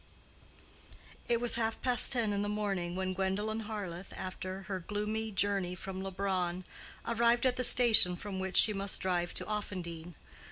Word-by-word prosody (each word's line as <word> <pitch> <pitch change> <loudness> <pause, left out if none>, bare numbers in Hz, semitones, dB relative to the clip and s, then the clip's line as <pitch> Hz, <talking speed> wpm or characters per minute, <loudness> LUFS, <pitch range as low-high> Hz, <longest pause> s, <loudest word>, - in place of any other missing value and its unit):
It 235 -1 +1
was 240 -1 +2
half 225 -1 -2
past 250 -1 +5
ten 225 -4 -1
in 200 - -2
the 205 - -3
morning 195 -4 -3
when 185 0 -3
Gwendolen 205 +4 -3
Harleth, 195 -4 -7
after 185 +1 -7
her 190 0 -5
gloomy 210 +4 -4
journey 195 -2 -1
from 190 0 -8
Leubronn, 185 -2 -3 0.4
arrived 235 +1 +1
at 255 -1 +1
the 255 - -3
station 225 -7 +8
from 190 +1 -7
which 190 0 -2
she 215 - +6
must 195 -1 0
drive 175 -2 -2
to - - +1
Offendene. 175 -5 -6
195 Hz, 160 wpm, -30 LUFS, 185-220 Hz, 0.4 s, station